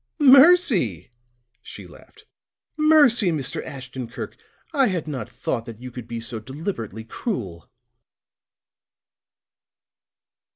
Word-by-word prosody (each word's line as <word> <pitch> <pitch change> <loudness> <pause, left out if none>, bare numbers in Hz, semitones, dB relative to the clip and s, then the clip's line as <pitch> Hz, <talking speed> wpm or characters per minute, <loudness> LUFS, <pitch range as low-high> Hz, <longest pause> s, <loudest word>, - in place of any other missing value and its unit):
"Mercy!" 265 - +5 0.5
She - - -11
laughed. - - -17 0.5
"Mercy, 300 - +4
Mr. 145 -5 -3
Ashton 130 -2 -8
Kirk. 115 - -8 0.4
I 275 -4 +3
had 180 -6 -3
not 130 -7 -5
thought 115 -2 -4
that 115 -3 -10
you 125 0 -9
could 120 -2 -9
be 115 0 -5
so 115 0 -5
deliberately 115 - -6
cruel!" 110 - -6
130 Hz, 100 wpm, -23 LUFS, -, 0.5 s, Mercy